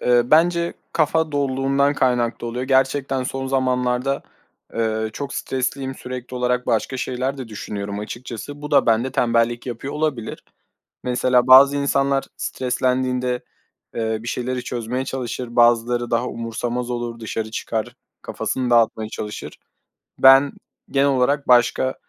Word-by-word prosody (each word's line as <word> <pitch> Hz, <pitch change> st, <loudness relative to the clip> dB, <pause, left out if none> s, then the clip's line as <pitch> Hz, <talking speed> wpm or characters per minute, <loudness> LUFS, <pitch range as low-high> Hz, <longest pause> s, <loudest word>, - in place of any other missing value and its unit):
Eee, 120 Hz, -1 st, +4 dB
bence 170 Hz, +4 st, +3 dB, 0.2 s
kafa 160 Hz, 0 st, +1 dB
doluluğundan 140 Hz, 0 st, +1 dB
kaynaklı 120 Hz, -3 st, 0 dB
oluyor. 125 Hz, +2 st, -3 dB
Gerçekten 135 Hz, 0 st, +1 dB
son 135 Hz, +1 st, -4 dB
zamanlarda, 130 Hz, 0 st, 0 dB, 0.5 s
eee, 110 Hz, -1 st, -1 dB
çok 140 Hz, +2 st, -5 dB
stresliyim, 130 Hz, +1 st, -2 dB
sürekli 125 Hz, -1 st, -7 dB
olarak 125 Hz, 0 st, 0 dB
başka 115 Hz, +4 st, 0 dB
şeyler 130 Hz, +2 st, -2 dB
de 130 Hz, -4 st, -6 dB
düşünüyorum 100 Hz, -1 st, -5 dB
açıkçası. 120 Hz, +6 st, -7 dB
Bu 150 Hz, -, -6 dB
da 145 Hz, -, +4 dB
bende 115 Hz, +3 st, +2 dB
tembellik 120 Hz, 0 st, +1 dB
yapıyor 125 Hz, +3 st, -5 dB
olabilir. 150 Hz, -7 st, -3 dB, 0.6 s
Mesela 125 Hz, 0 st, +2 dB
bazı 140 Hz, +2 st, +8 dB
insanlar 140 Hz, -1 st, +1 dB
streslendiğinde, 125 Hz, -1 st, -1 dB, 0.5 s
eee, 110 Hz, -1 st, -1 dB
bir 120 Hz, -, -9 dB
şeyleri 125 Hz, +1 st, -2 dB
çözmeye 125 Hz, +2 st, -3 dB
çalışır, 125 Hz, -2 st, -5 dB
bazıları 120 Hz, 0 st, +3 dB
daha 120 Hz, +1 st, +1 dB
umursamaz 120 Hz, +1 st, -4 dB
olur, 120 Hz, -1 st, -4 dB
dışarı 110 Hz, 0 st, -4 dB
çıkar, 110 Hz, 0 st, -3 dB, 0.3 s
kafasını 130 Hz, -1 st, -3 dB
dağıtmaya 115 Hz, -2 st, +2 dB
çalışır. 105 Hz, -1 st, -7 dB, 0.6 s
Ben 135 Hz, +1 st, +7 dB, 0.4 s
genel 140 Hz, 0 st, +2 dB
olarak 140 Hz, +2 st, +1 dB
başka 125 Hz, +1 st, +3 dB
125 Hz, 130 wpm, -21 LUFS, 120-135 Hz, 0.6 s, bazı